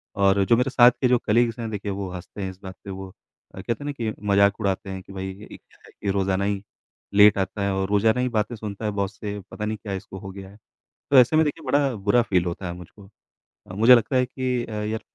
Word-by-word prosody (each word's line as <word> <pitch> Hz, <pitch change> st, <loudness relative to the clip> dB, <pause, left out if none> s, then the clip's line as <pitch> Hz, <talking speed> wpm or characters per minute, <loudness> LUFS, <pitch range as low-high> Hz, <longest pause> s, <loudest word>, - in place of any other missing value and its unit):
और 100 Hz, 0 st, +3 dB
जो 115 Hz, -, +4 dB
मेरे 125 Hz, +2 st, +1 dB
साथ 125 Hz, -1 st, +7 dB
के 130 Hz, -, +4 dB
जो 125 Hz, 0 st, +4 dB
कलीग्स 115 Hz, +1 st, +2 dB
हैं 115 Hz, -1 st, -3 dB
देखिए 100 Hz, -1 st, -4 dB
वो 100 Hz, -1 st, -4 dB
हँसते 90 Hz, +3 st, -8 dB
हैं 95 Hz, -, -3 dB
इस 95 Hz, -, -16 dB
बात 95 Hz, 0 st, -8 dB
पे -, -, -9 dB
वो 95 Hz, 0 st, -7 dB, 0.5 s
अ, 95 Hz, -, -7 dB
कहते 115 Hz, +7 st, -3 dB
हैं -, -, -7 dB
ना 145 Hz, -, -2 dB
कि 115 Hz, -6 st, -3 dB, 0.2 s
मजाक 100 Hz, +1 st, +4 dB
उड़ाते 100 Hz, -1 st, -1 dB
हैं 95 Hz, 0 st, -5 dB
कि 95 Hz, -, -13 dB
भई 95 Hz, 0 st, -5 dB
ये 100 Hz, +2 st, -13 dB, 0.3 s
है -, -, -19 dB
कि 100 Hz, -, -5 dB
रोज़ाना 95 Hz, 0 st, 0 dB
ही 100 Hz, -1 st, -1 dB, 0.5 s
लेट 105 Hz, 0 st, +7 dB
आता 100 Hz, +1 st, -2 dB
है 100 Hz, -, 0 dB
और 95 Hz, 0 st, -1 dB
रोज़ाना 110 Hz, +3 st, +3 dB
ही 125 Hz, -, 0 dB
बातें 110 Hz, 0 st, -1 dB
सुनता 105 Hz, -1 st, -6 dB
है 105 Hz, -, 0 dB
बॉस 100 Hz, -2 st, -3 dB
से, 105 Hz, -1 st, -5 dB
पता 105 Hz, -, -5 dB
नहीं 110 Hz, 0 st, -3 dB
क्या 100 Hz, -1 st, -6 dB
इसको 95 Hz, 0 st, -7 dB
हो 95 Hz, -, -8 dB
गया 95 Hz, 0 st, -10 dB
है। 100 Hz, -, -16 dB, 0.5 s
तो 140 Hz, -, +5 dB
ऐसे 125 Hz, +5 st, +5 dB
में 160 Hz, -, +5 dB
देखिए 155 Hz, +1 st, -4 dB
बड़ा 140 Hz, 0 st, +2 dB
बुरा 105 Hz, +4 st, +2 dB
फील 95 Hz, -6 st, +1 dB
होता 90 Hz, +2 st, -4 dB
है 90 Hz, -, -4 dB
मुझको। 90 Hz, +3 st, -13 dB, 0.6 s
अ, 90 Hz, -, -9 dB
मुझे 115 Hz, +5 st, +7 dB
लगता 120 Hz, +2 st, +2 dB
है 125 Hz, 0 st, +3 dB
कि 125 Hz, -1 st, -2 dB, 0.3 s
यार 110 Hz, -, -3 dB
105 Hz, 260 wpm, -24 LUFS, 95-120 Hz, 0.6 s, साथ